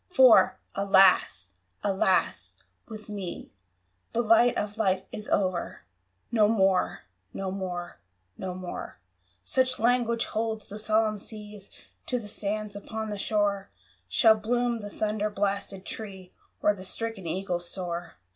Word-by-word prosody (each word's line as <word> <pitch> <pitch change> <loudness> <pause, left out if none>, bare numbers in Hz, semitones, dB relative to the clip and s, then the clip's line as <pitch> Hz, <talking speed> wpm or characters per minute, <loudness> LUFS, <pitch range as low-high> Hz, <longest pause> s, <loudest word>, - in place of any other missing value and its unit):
For, 260 -9 +6 0.2
alas! 190 - +4 0.3
alas! 190 -2 +1 0.3
with 215 -2 -9
me 200 -4 -6 0.6
The 235 - +1
light 230 +2 +5
of 210 +1 -3
Life 190 -3 +2
is 210 - -6
o'er! 185 -3 0 0.5
"No 215 -3 +5
more 195 -4 +2 0.3
no 190 -1 -3
more 180 -2 -5 0.4
no 185 -1 -5
more 180 - -6 0.2
" 90 0 -39
(Such 255 - +1
language 235 0 +2
holds 220 -1 -3
the 210 - -6
solemn 215 0 +2
sea 210 -1 -9 0.5
To 250 - 0
the 225 -4 -6
sands 210 0 -3
upon 220 +1 -5
the 205 - -4
shore) 200 -2 0 0.4
Shall 220 - +6
bloom 235 +2 0
the 205 - -6
thunder 215 0 -1
blasted 200 -1 -2
tree 190 -4 -8 0.3
Or 210 - +5
the 190 -2 -9
stricken 215 -1 -4
eagle 180 +1 -2
soar! 175 -1 -5
205 Hz, 135 wpm, -28 LUFS, 190-220 Hz, 0.6 s, For